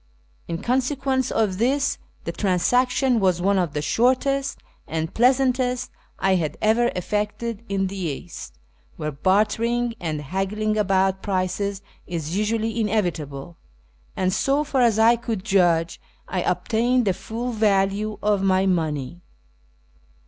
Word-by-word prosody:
In 165 Hz, -, -3 dB
consequence 260 Hz, +1 st, 0 dB
of 205 Hz, -4 st, 0 dB
this, 275 Hz, +4 st, +1 dB, 0.2 s
the -, -, -3 dB
trans 185 Hz, 0 st, 0 dB
action 250 Hz, 0 st, +3 dB
was 185 Hz, -3 st, +2 dB
one 195 Hz, +2 st, +2 dB
of 170 Hz, -5 st, -1 dB
the 150 Hz, -, -2 dB
shortest 270 Hz, -, +1 dB, 0.3 s
and 160 Hz, 0 st, -3 dB
pleasantest 255 Hz, 0 st, +2 dB, 0.3 s
I 190 Hz, 0 st, +2 dB
had 155 Hz, -, -3 dB
ever 225 Hz, +3 st, +3 dB
effected 210 Hz, +4 st, -3 dB
in 195 Hz, -1 st, 0 dB
the 195 Hz, +1 st, -5 dB
East, 170 Hz, -, -6 dB, 0.4 s
where 150 Hz, -, -3 dB
bartering 220 Hz, -, +1 dB
and 155 Hz, -3 st, -3 dB
haggling 195 Hz, +7 st, -1 dB
about 190 Hz, -2 st, +1 dB
prices 195 Hz, +1 st, -2 dB, 0.2 s
is 165 Hz, -1 st, -4 dB
usually 220 Hz, +2 st, 0 dB
inevitable; 170 Hz, -8 st, -2 dB, 0.6 s
and, 185 Hz, 0 st, 0 dB
so 275 Hz, +7 st, +1 dB
far 275 Hz, -3 st, 0 dB
as 230 Hz, -3 st, +4 dB
I 230 Hz, +2 st, +5 dB
could 225 Hz, -5 st, -4 dB
judge, 175 Hz, -4 st, +2 dB, 0.3 s
I -, -, -2 dB
obtained 240 Hz, +2 st, +1 dB
the 190 Hz, -, +2 dB
full 235 Hz, +6 st, -5 dB
value 210 Hz, -1 st, +1 dB
of 205 Hz, -2 st, +2 dB
my 190 Hz, 0 st, +2 dB
money. 160 Hz, -4 st, -1 dB
210 Hz, 135 wpm, -23 LUFS, 185-240 Hz, 0.6 s, I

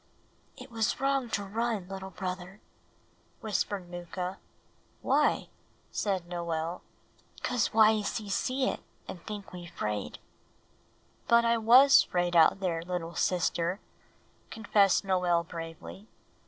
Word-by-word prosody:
"It -, -, -11 dB
was 225 Hz, +1 st, -1 dB
wrong 275 Hz, -2 st, 0 dB
to 205 Hz, -, -1 dB
run, 215 Hz, -1 st, -2 dB
little 190 Hz, 0 st, -7 dB
brother," 185 Hz, +1 st, -6 dB, 0.8 s
whispered 205 Hz, -3 st, -2 dB
Mooka. 180 Hz, +2 st, -6 dB, 0.6 s
"Why?" -, -, +2 dB, 0.4 s
said 190 Hz, -4 st, -2 dB
Noel. 170 Hz, -1 st, -3 dB, 0.6 s
"Cause 245 Hz, -3 st, +1 dB
Wayeeses 215 Hz, -1 st, +2 dB
see 260 Hz, +5 st, 0 dB
it, -, -, -2 dB, 0.3 s
and 175 Hz, -, -8 dB
think 205 Hz, -3 st, -7 dB
we 175 Hz, -1 st, -8 dB
'fraid." 105 Hz, -, -4 dB, 1.1 s
"But 235 Hz, 0 st, +5 dB
I 230 Hz, 0 st, +3 dB
was 255 Hz, +5 st, +7 dB
'fraid 175 Hz, -1 st, -1 dB
out 170 Hz, +4 st, +5 dB
there, 170 Hz, -3 st, -1 dB
little 170 Hz, -1 st, -4 dB
sister," 175 Hz, +1 st, 0 dB, 0.7 s
confessed 205 Hz, -3 st, +2 dB
Noel 180 Hz, -3 st, +2 dB
bravely. 165 Hz, +5 st, -9 dB
190 Hz, 115 wpm, -29 LUFS, 175-220 Hz, 1.1 s, was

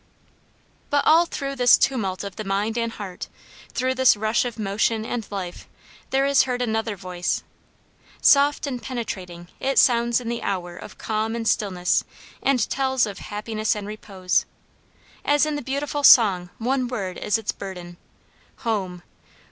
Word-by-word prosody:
But 285 Hz, 0 st, +2 dB
all 335 Hz, +2 st, +5 dB
through 275 Hz, -3 st, -4 dB
this 245 Hz, -1 st, +6 dB
tumult 200 Hz, -9 st, 0 dB
of 200 Hz, -2 st, -7 dB
the 215 Hz, -, -5 dB
mind 205 Hz, +3 st, -1 dB
and 230 Hz, -1 st, -1 dB
heart, 190 Hz, -3 st, -7 dB, 0.4 s
through 255 Hz, +1 st, 0 dB
this 260 Hz, -4 st, +4 dB
rush 220 Hz, +3 st, +1 dB
of 240 Hz, -2 st, -5 dB
motion 215 Hz, +2 st, 0 dB
and 230 Hz, -2 st, -4 dB
life 185 Hz, -3 st, -6 dB, 0.4 s
there 270 Hz, +1 st, +2 dB
is 280 Hz, 0 st, +5 dB
heard 250 Hz, 0 st, -1 dB
another 225 Hz, -2 st, -1 dB
voice. 180 Hz, -2 st, -3 dB, 0.8 s
Soft 285 Hz, +1 st, +4 dB
and 255 Hz, -4 st, -4 dB
penetrating 185 Hz, -8 st, -6 dB
it 270 Hz, +1 st, -1 dB
sounds 235 Hz, -1 st, +4 dB
in 245 Hz, -, -8 dB
the 235 Hz, 0 st, -3 dB
hour 175 Hz, -3 st, -3 dB
of -, -, -11 dB
calm 220 Hz, +1 st, -2 dB
and 230 Hz, -1 st, -3 dB
stillness 185 Hz, -5 st, +1 dB, 0.4 s
and 260 Hz, -5 st, +2 dB
tells 265 Hz, -2 st, +1 dB
of 200 Hz, -2 st, -7 dB
happiness 215 Hz, +1 st, -2 dB
and 205 Hz, -1 st, -5 dB
repose. 195 Hz, -3 st, -1 dB, 0.8 s
As 290 Hz, +1 st, +3 dB
in 305 Hz, -1 st, -2 dB
the 290 Hz, -, -3 dB
beautiful 285 Hz, +2 st, -3 dB
song 195 Hz, -9 st, +7 dB
one 255 Hz, +2 st, 0 dB
word 200 Hz, -7 st, -4 dB
is 210 Hz, -, +1 dB
its 220 Hz, -2 st, -2 dB
burden, 180 Hz, -3 st, -8 dB, 0.7 s
Home! 190 Hz, -6 st, -2 dB
225 Hz, 155 wpm, -23 LUFS, 195-255 Hz, 0.8 s, song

